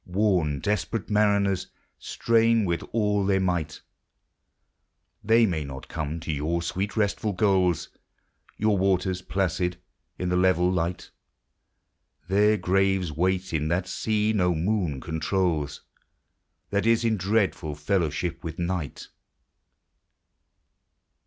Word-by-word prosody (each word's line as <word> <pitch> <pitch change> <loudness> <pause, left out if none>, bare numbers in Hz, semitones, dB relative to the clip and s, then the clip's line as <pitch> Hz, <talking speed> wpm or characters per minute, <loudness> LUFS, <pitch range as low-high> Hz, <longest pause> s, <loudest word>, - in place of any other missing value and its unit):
'2V - - -12
Worn, 90 -8 +2
desperate 105 +1 -2
mariners 100 -3 +2 0.3
strain 115 -1 +2
with 85 -2 -1
all 105 -2 +1
their 95 0 +2
might: 85 -5 -1 1.4
They 115 +2 +5
may 85 -7 -1
not 70 -1 -8
come 80 0 -4
to 80 - -3
your 80 +4 -1
sweet 95 +6 -3
restful 105 0 0
goals, 90 -4 +2 0.7
Your 105 -2 +2
waters 95 -1 +1
placid 90 -2 -1 0.4
in 90 - -2
the 90 - +1
level 90 -1 +3
light: 90 0 -2 0.6
— - - -46
Their 105 +2 +4
graves 95 -1 +1
wait 90 +3 -1
in 75 -1 0
that 90 +3 0
sea 110 +1 0
no 90 -4 +2
moon 85 -5 -1
controls, 80 -1 -1 0.9
That 100 +1 +1
is 115 0 +3
in 110 -1 +2
dreadful 95 -6 0
fellowship 85 +1 -1
with 80 -1 -6
Night. 85 -4 -3
95 Hz, 120 wpm, -26 LUFS, 85-100 Hz, 1.4 s, They